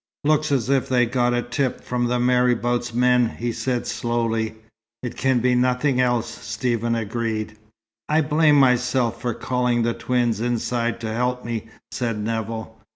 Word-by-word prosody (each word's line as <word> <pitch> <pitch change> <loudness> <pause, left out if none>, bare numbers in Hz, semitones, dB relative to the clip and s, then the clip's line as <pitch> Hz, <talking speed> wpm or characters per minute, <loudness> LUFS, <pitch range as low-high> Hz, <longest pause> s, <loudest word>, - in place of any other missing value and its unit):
"Looks 155 0 +2
as 130 -5 +1
if 135 -1 +1
they'd 125 -2 +2
got 120 -1 +2
a 120 - 0
tip 130 +1 -2
from 120 -1 -1
the 125 0 0
marabout's 120 -1 +1
men," 125 0 +2
he 120 +1 -2
said 125 +1 -2
slowly. 115 -2 -1 0.5
"It 120 - -4
can 130 -1 +1
be 125 +1 +3
nothing 125 +2 +2
else," 120 -2 +1 0.2
Stephen 115 +2 -1
agreed. 110 -1 -3 0.5
"I 155 +1 +3
blame 150 0 +3
myself 125 -3 +2
for 120 -3 -2
calling 125 -1 0
the 115 0 +1
twins 115 -2 0
inside 120 0 -1
to 110 -1 -3
help 125 +1 -1
me," 115 -2 -4 0.2
said 115 -3 -2
Nevill. 110 +1 -4
120 Hz, 160 wpm, -23 LUFS, 115-125 Hz, 0.5 s, be